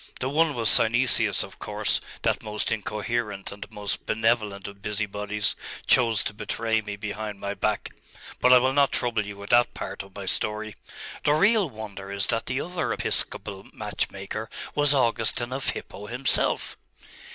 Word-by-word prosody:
The 130 - -1
one 155 +1 +2
was 115 -2 +1
Synesius 115 -2 +6
of - - -12
course; - - +1 0.2
that - - +1
most 105 0 -2
incoherent 105 -1 -3
and 100 0 -9
most 105 -1 -4
benevolent 110 -3 0
of 100 -1 -11
busybodies 105 0 -2 0.3
chose 115 -4 +4
to - - -3
betray 110 +1 -1
me 105 -1 -6
behind 105 0 -5
my 100 0 -3
back: 105 0 -1 0.5
but 125 - +4
I 125 - +10
will 130 +2 +2
not 140 0 +3
trouble 115 -3 0
you 100 0 -8
with 100 0 -8
that 120 0 +4
part - - -5
of 95 0 -14
my 100 -1 -6
story. 110 +2 0 0.5
The 145 - +3
real 200 +1 +3
wonder 105 -4 -8
is 100 0 0
that 115 - -2
the 130 +2 -1
other 180 0 -3
episcopal 95 -1 0
match - - -3
maker - - -6 0.2
was 145 -1 +4
Augustine 120 -1 +1
of 135 +1 -2
Hippo 105 +1 -7
himself! 125 +4 +1
110 Hz, 165 wpm, -25 LUFS, 100-125 Hz, 0.5 s, I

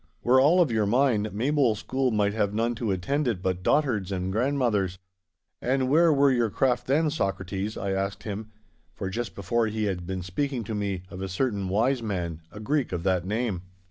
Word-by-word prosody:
Were 130 +2 +5
all 160 +7 +5
of 155 -8 +2
your 110 -2 +1
mind, 115 -2 +2
Maybole 125 +2 +2
school 130 +4 -1
might 105 -3 +1
have 105 -2 0
none 115 +2 +1
to 115 -1 -3
attend 135 +10 0
it 110 -6 0
but 90 -1 -1
dotards 105 -6 +1
and 95 0 -2
grandmothers! 110 -6 +1 0.6
And 130 +1 +1
where 165 +3 +5
were 140 -1 +4
your 120 -3 +2
craft 125 +2 0
then, 150 +3 +2
Socrates?' 95 - -2
I 100 - -2
asked 95 +1 -2
him, 105 0 -5 0.5
for 95 -1 -4
just 115 -1 -4
before 115 +4 0
he 110 0 -2
had 90 -4 -2
been 95 -1 -3
speaking 120 +7 -2
to 110 - -5
me 100 -3 -2
of 95 -1 -7
a 95 - -3
certain 100 -1 -1
wise 120 +6 +2
man, 90 -7 -3
a 105 - -9
Greek 140 +5 0
of 90 -2 -3
that 90 -2 +1
name. 105 -3 -1
110 Hz, 200 wpm, -26 LUFS, 95-130 Hz, 0.6 s, Were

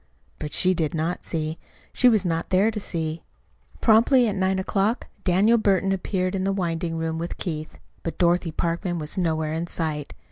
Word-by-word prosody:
But 150 - -5
she 185 0 +3
did 160 -3 -1
not 165 +3 -2
see. 155 -1 -3 0.3
She 250 - +5
was 215 -4 +2
not 165 -1 -1
there 195 +4 +3
to 215 - -4
see. 165 -4 -3 0.6
Promptly 235 +3 +5
at 210 - 0
nine 190 0 +1
o'clock 195 +4 0 0.2
Daniel 205 +6 +4
Burton 195 -2 +2
appeared 185 0 -1
at 190 - -1
the 195 - +1
winding 170 -3 -2
room 160 0 -2
with 170 +1 -4
Keith. 155 -3 -4 0.2
But 165 - -5
Dorothy 175 -1 +2
Parkman 170 +2 -2
was 150 -1 -3
nowhere 160 -4 0
in 165 +2 -2
sight. 155 -4 -3
175 Hz, 180 wpm, -24 LUFS, 165-195 Hz, 0.6 s, She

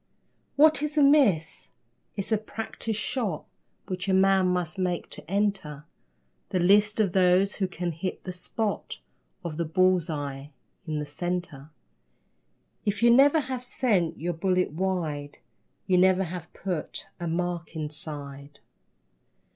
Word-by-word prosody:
What 310 +1 +5
is 300 +1 -2
a 295 - +6
miss? 255 - +3 0.5
It's 200 +2 -3
a 220 - +4
practice 220 0 -5
shot 215 - -2 0.4
Which 185 +1 -4
a 190 - +4
man 190 -1 +4
must 180 0 -1
make 180 -2 -2
to 150 - -9
enter 195 -8 -1 0.6
The 190 - 0
list 205 +4 +4
of 205 -4 +3
those 185 +2 +3
who 190 - 0
can 175 -1 -3
hit 175 +4 -5
the 185 - -5
spot 205 +4 -3 0.5
Of 155 -3 -4
the 170 - 0
bull's 185 +1 +2
eye 140 -2 -5 0.4
in 155 -1 -2
the 150 - -2
centre. 155 -2 -4 1.1
If 205 +2 -1
you 235 - +7
never 280 +5 +6
have 255 -2 -5
sent 210 -9 0
your 175 +2 -2
bullet 180 +1 0
wide, 155 -5 -2 0.5
You 180 -1 +3
never 185 +1 +4
have 175 -1 -7
put 180 -5 -4
a 175 - -3
mark 170 0 -3
inside. 145 -2 -5
180 Hz, 140 wpm, -27 LUFS, 160-205 Hz, 1.1 s, you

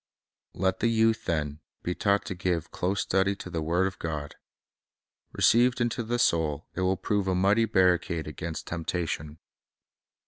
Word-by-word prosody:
Let 95 0 0
the - - +2
youth, 115 -1 +2
then, 75 -3 -1 0.2
be 90 - -1
taught 100 +2 +1
to - - -3
give 90 -2 -2
close 95 +2 -1
study 95 +1 +1
to 90 -2 -9
the 80 - -2
word 85 +4 +1
of 95 0 -4
God. 75 -3 -4 1.0
Received 120 +1 +4
into 120 0 0
the 120 +1 -1
soul, 80 -8 +1
it - - -3
will 95 +1 +2
prove 100 +1 -1
a 95 - +1
mighty 100 +5 +3
barricade 90 -5 +2
against 80 +1 -5
temptation. 80 -2 -3
95 Hz, 160 wpm, -28 LUFS, 85-100 Hz, 1.0 s, Received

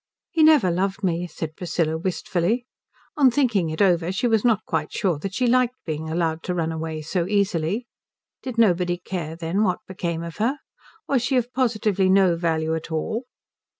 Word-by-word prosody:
"He 330 -3 +1
never 305 - +6
loved 195 +3 -1
me," 175 -1 0
said 160 -1 -6
Priscilla, 165 -3 -1
wistfully. 185 +6 -1 0.5
On 275 -3 +6
thinking 230 - +1
it 160 +5 +1
over 175 -2 +2
she 190 +6 -1
was 225 -3 +2
not 225 -4 +2
quite - - -2
sure 180 -7 0
that 195 +4 -5
she 255 - +1
liked 250 0 +3
being 155 0 -4
allowed 165 -1 -1
to 180 - -2
run 165 -2 -1
away 160 -1 -4
so 170 +2 -1
easily. 200 +1 0 0.6
Did 255 -3 -6
nobody 180 -5 +3
care, 175 -3 -5
then, 170 +4 -1
what 185 -4 0
became 170 -3 -3
of 170 -1 -7
her? 235 +7 0 0.5
Was 270 -3 +2
she 255 +2 +1
of 245 +1 -1
positively 215 -6 +1
no 190 -2 +5
value 160 -1 0
at 160 0 -4
all? 220 +10 -2
185 Hz, 185 wpm, -23 LUFS, 165-225 Hz, 0.6 s, never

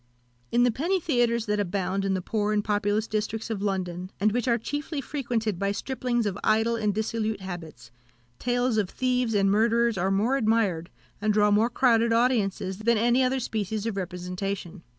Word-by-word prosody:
In 240 +1 +4
the 245 - +4
penny 340 - 0
theatres 240 -7 +1
that 210 -1 0
abound 195 0 -1
in 195 -1 +1
the 185 - -3
poor 210 +1 -1
and 210 -1 +1
populous 205 +1 0
districts 215 +1 -3
of 205 -3 -3
London, 185 -3 -2
and 210 +2 +3
which 245 +3 -1
are 235 -1 +3
chiefly 290 +6 -4
frequented 235 - -2
by 200 0 0
striplings 240 +2 -2
of 205 -1 -2
idle 220 +2 +2
and 215 -2 0
dissolute 220 0 -2
habits, 160 -10 -8 0.5
tales 245 -1 0
of 195 -4 -1
thieves 250 -3 0
and 195 -1 +3
murderers 230 0 +2
are 190 +2 +1
more 215 +8 +2
admired, 215 -8 +1 0.3
and 215 0 +2
draw 210 0 +4
more 215 +3 +3
crowded 235 -2 +3
audiences, 210 -5 +1
than 230 +1 +2
any 240 +4 +3
other 260 +1 +1
species 215 -3 -3
of 225 -3 -2
representation. 180 0 -4
215 Hz, 180 wpm, -26 LUFS, 195-235 Hz, 0.5 s, In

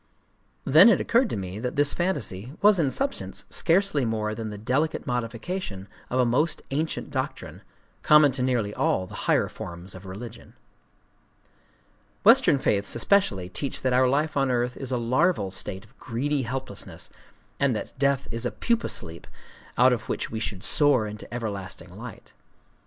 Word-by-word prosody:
Then 165 - +8
it - - +4
occurred 235 0 +2
to - - -3
me 95 +1 -5
that 125 +2 -3
this 145 0 +3
fantasy 130 - -2
was 205 -2 +6
in 150 -5 +2
substance 275 - -2
scarcely 175 -4 +2
more 110 -2 -1
than 110 0 -5
the 105 - -7
delicate 130 +9 -1
modification 120 - -4 0.2
of 130 - 0
a 125 - +4
most 145 +8 +1
ancient 155 +3 -2
doctrine, - - -4 0.4
common 150 -2 +6
to 130 0 -3
nearly 120 -5 0
all 95 - 0
the - - -13 0.2
higher - - +3
forms 85 +2 -8
of 95 +1 -11
religion. 110 +5 -9 1.7
Western - - +6
faiths 100 -6 0
especially 115 - +2
teach 135 +9 -4
that 130 -1 +1
our 130 +1 +4
life 150 +3 0
on 135 -1 +2
earth 125 0 0
is 130 -2 -6
a 125 - +1
larval 120 - +1
state 95 +1 -4
of 120 +5 -25
greedy 140 +5 -1
helplessness, 130 -3 -6 0.5
and 140 -4 +2
that - - -5
death 140 -1 +1
is 115 0 -4
a 120 - 0
pupa 235 -1 -1
sleep 80 +1 -4 0.5
out 125 +1 +6
of 120 - -4
which - - -3
we 110 - -3
should 100 -4 -4
soar 145 -7 +3
into 105 0 -8
everlasting 105 -6 -6
light. - - -10
125 Hz, 165 wpm, -26 LUFS, 105-145 Hz, 1.7 s, Then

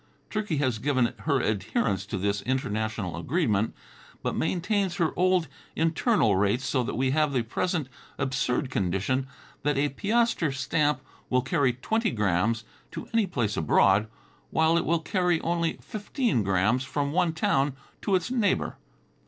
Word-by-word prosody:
Turkey 210 -7 -1
has 130 -6 0
given 130 -2 +1
her 140 -3 +2
adherence 105 -2 -1
to 100 - -3
this 100 +1 0
international 110 -7 -2
arrangement, 115 - 0 0.5
but - - -1
maintains 185 +2 0
her 165 -2 +1
old 185 -2 +2 0.3
internal 160 - +2
rates 105 +6 +1
so 130 - +1
that 120 - -3
we 130 +1 +1
have 150 0 +2
the 125 -3 +1
present 160 - -1 0.3
absurd 135 0 -1
condition, 100 +8 0 0.3
that 145 -1 0
a 145 +1 +2
piaster 210 - +1
stamp 145 +3 0 0.3
will 125 -1 +2
carry 140 -1 +2
twenty 220 - 0
grams 105 +1 +1 0.3
to - - -7
any 225 -3 +3
place 120 - -1
abroad, 95 +6 +3 0.4
while 160 +1 +3
it 170 - +1
will 165 0 +1
carry 180 0 +1
only 170 0 0
fifteen 215 - -1
grams 100 +6 +2
from 140 +1 -2
one 175 +1 +2
town 140 -3 +1 0.3
to 200 - +1
its 185 +6 -1
next 255 -2 +1
neighbor. 200 -2 0
135 Hz, 155 wpm, -27 LUFS, 110-170 Hz, 0.5 s, any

